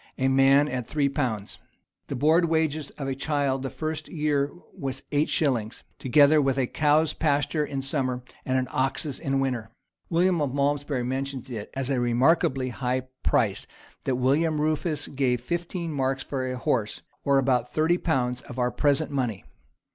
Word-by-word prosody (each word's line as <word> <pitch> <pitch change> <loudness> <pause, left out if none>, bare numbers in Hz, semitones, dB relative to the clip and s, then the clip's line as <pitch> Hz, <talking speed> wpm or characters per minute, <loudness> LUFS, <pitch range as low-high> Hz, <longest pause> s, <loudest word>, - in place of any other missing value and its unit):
A 130 0 +2
man 135 +2 +5
at 125 -4 -3
three 145 -2 +1
pounds.[] 115 -8 -3 0.5
The - - -4
board 160 +6 +4
wages 155 -3 0
of 140 - -4
a 135 - -1
child 140 -1 0
the 135 - -3
first 155 +1 -4
year 150 -3 0 0.2
was 135 -1 -5
eight 150 +1 +2
shillings, 120 -7 0 0.2
together 145 +3 +5
with 135 -1 +1
a 130 - +2
cow's 155 +3 +2
pasture 150 0 +1
in 140 -2 -4
summer, 130 -3 -1 0.2
and 130 0 0
an 130 -1 0
ox's 135 +2 -1
in 135 0 0
winter.[] 125 -5 -1 0.4
William 175 0 +2
of 140 -2 -1
Malmsbury 140 -2 0
mentions 135 +1 -4
it 105 -3 -5
as 135 0 -2
a 130 - +1
remarkably 130 +2 +2
high 130 +1 -2
price - - +1 0.4
that 130 - +1
William 150 +5 +2
Rufus 155 0 0
gave 130 -3 0
fifteen 170 +5 -3
marks 135 -1 -1
for 130 -2 -3
a 130 - -3
horse, 115 -3 -1 0.2
or 140 -1 +3
about 125 -2 +1
thirty 160 +3 +2
pounds 125 -6 0
of 125 - -10
our 125 0 +1
present 145 +1 +1
money. 125 -8 -2
135 Hz, 170 wpm, -26 LUFS, 130-150 Hz, 0.5 s, man